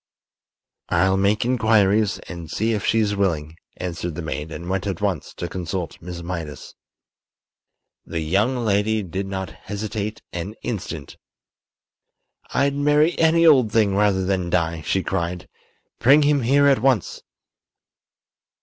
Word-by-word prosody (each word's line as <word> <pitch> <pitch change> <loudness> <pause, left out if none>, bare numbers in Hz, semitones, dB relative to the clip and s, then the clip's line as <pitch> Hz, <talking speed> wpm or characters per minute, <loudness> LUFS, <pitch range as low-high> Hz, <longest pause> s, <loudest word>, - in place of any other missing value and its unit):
"I'll 95 +2 +3
make 100 +3 +2
inquiries 110 -4 +3
and 85 -3 -8
see 110 +6 0
if 105 -3 -2
she's 110 -2 +2
willing," 80 -5 -1 0.2
answered 85 -2 -4
the 85 - -5
maid, 75 0 -4
and 85 +1 -7
went 95 +2 -2
at 95 -4 -3
once 95 -7 -2
to 85 - -4
consult 90 0 -5
Miss 85 0 -7
Mydas. 85 -5 -6 1.3
The 80 0 -3
young 100 +11 +1
lady 105 +1 +1
did 95 +2 -4
not 95 -1 -4
hesitate 105 +1 -5
an 90 +5 -5
instant. 90 - -5 1.3
"I'd 140 0 +2
marry 150 +3 +3
any 165 +1 +4
old 130 -9 +5
thing 105 -4 +2
rather 100 -2 +2
than 90 -2 -1
die!" 85 -2 0
she - - -1
cried. 85 +1 -3 0.5
"Bring 140 +5 +6
him 145 -1 +3
here 140 +4 +3
at 140 -3 +4
once!" 125 -8 +1
100 Hz, 135 wpm, -22 LUFS, 85-110 Hz, 1.3 s, Bring